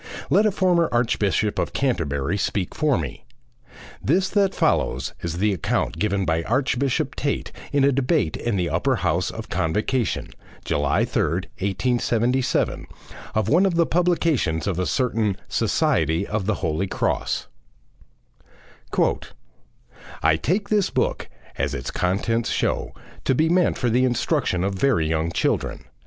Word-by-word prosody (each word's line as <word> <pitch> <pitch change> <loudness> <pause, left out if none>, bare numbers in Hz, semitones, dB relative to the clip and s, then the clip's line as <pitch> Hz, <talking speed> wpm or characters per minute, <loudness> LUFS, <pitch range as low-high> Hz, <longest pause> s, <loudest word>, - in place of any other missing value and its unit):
Let 215 - +5
a - - +2
former 180 -4 +2
Archbishop 110 -3 +1
of - - -2
Canterbury 85 - 0
speak 100 -2 -1
for 150 -5 +2
me. 75 -6 -5 0.8
This 190 +1 +2
that 200 -2 +2
follows 65 +1 +1
is 85 -1 -3
the 105 +2 +2
account 90 - -1
given 100 -2 0
by 80 -1 +1
Archbishop 130 - 0
Tait 140 0 -2 0.2
in 145 -1 +2
a 140 - +5
debate 135 - +1
in 120 -3 -2
the 90 -3 0
Upper - - +1
House - - 0
of - - -8
Convocation 105 +9 -1 0.4
(July 75 -1 +1
3rd, 90 +3 0 0.2
1877) 120 +5 0 0.5
of 110 -2 +1
one 165 +10 +4
of 190 -3 +2
the 170 0 +4
publications 165 - +1
of 95 -3 -1
a 90 - 0
certain 110 -6 0
SOCIETY 80 +4 +1
OF 105 -2 -3
THE 110 - +2
HOLY 85 +2 -1
CROSS: - - -1 2.8
"I 80 -1 +5
take 190 - -1
this 210 -3 +2
book, - - -1 0.3
as - - -1
its - - -4
contents 110 +6 0
show, - - -1 0.3
to 130 - +2
be 160 +4 +2
meant 180 0 +2
for 120 -2 0
the 125 +3 +3
instruction 125 - 0
of 100 +1 0
very 95 -6 +2
young 80 +1 0
children. - - -1
115 Hz, 145 wpm, -23 LUFS, 90-140 Hz, 2.8 s, Let